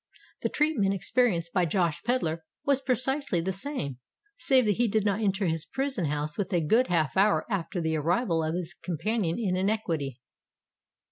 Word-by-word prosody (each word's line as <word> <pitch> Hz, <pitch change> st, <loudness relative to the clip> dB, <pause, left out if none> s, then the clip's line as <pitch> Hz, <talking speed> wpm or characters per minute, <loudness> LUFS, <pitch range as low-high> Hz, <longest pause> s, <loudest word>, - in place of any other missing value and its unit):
The -, -, 0 dB
treatment 240 Hz, -11 st, +1 dB
experienced 195 Hz, -5 st, +1 dB
by 180 Hz, -2 st, +3 dB
Josh 170 Hz, -2 st, 0 dB
Pedler 170 Hz, -10 st, -1 dB, 0.2 s
was 280 Hz, -1 st, +2 dB
precisely 265 Hz, -, 0 dB
the 180 Hz, +3 st, -1 dB
same, 190 Hz, -, -4 dB, 0.4 s
save 260 Hz, -, +3 dB
that 205 Hz, -2 st, +1 dB
he 240 Hz, 0 st, +3 dB
did 215 Hz, 0 st, +1 dB
not 205 Hz, +1 st, +1 dB
enter 200 Hz, -1 st, +1 dB
his 165 Hz, -2 st, 0 dB
prison 265 Hz, -9 st, -2 dB
house 150 Hz, +1 st, -2 dB
until 190 Hz, -2 st, 0 dB
a 165 Hz, -, 0 dB
good 235 Hz, +11 st, +4 dB
half 155 Hz, -5 st, +1 dB
hour 200 Hz, +2 st, +3 dB
after 185 Hz, -1 st, -2 dB
the 160 Hz, -1 st, 0 dB
arrival 165 Hz, -, +1 dB
of 160 Hz, +1 st, -1 dB
his 175 Hz, -1 st, -3 dB
companion 180 Hz, +1 st, -2 dB
in 200 Hz, -6 st, 0 dB
iniquity. 175 Hz, -, -1 dB
190 Hz, 175 wpm, -28 LUFS, 165-230 Hz, 0.4 s, good